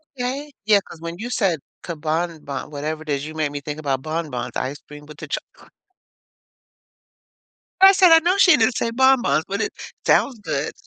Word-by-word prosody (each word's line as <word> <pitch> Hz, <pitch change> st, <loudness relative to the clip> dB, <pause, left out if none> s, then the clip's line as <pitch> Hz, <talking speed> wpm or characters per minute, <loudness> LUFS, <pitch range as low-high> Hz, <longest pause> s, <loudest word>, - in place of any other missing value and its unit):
Yeah, 245 Hz, -1 st, -2 dB
eh 285 Hz, +3 st, -5 dB
yeah 210 Hz, -2 st, +5 dB
'cause 160 Hz, -, -13 dB
when 170 Hz, +1 st, -6 dB
you 240 Hz, +3 st, -6 dB
said 185 Hz, -10 st, +1 dB, 0.2 s
"Kanban” 160 Hz, -2 st, -4 dB
whatever 155 Hz, +2 st, -4 dB
is, 140 Hz, -1 st, -2 dB
you 155 Hz, -, -7 dB
made 155 Hz, -2 st, -1 dB
me 145 Hz, 0 st, -5 dB
think 150 Hz, +1 st, -6 dB
about 135 Hz, -3 st, -2 dB
bonbons 155 Hz, -6 st, -4 dB
ice 140 Hz, +3 st, -3 dB
cream 150 Hz, 0 st, -12 dB
with 150 Hz, -1 st, -12 dB
the -, -, -8 dB
choc -, -, -2 dB, 2.4 s
I 385 Hz, 0 st, +10 dB
said, 370 Hz, -3 st, +5 dB
"I 325 Hz, -, +9 dB
know 355 Hz, +4 st, +1 dB
she 360 Hz, -5 st, +7 dB
didn't 230 Hz, +2 st, +2 dB
say 230 Hz, -, -1 dB
bonbons." 260 Hz, -9 st, +3 dB
But 200 Hz, +2 st, -2 dB
it -, -, -2 dB, 0.3 s
sounds 250 Hz, -5 st, +2 dB
good. 155 Hz, -7 st, -3 dB
165 Hz, 180 wpm, -22 LUFS, 150-245 Hz, 2.4 s, I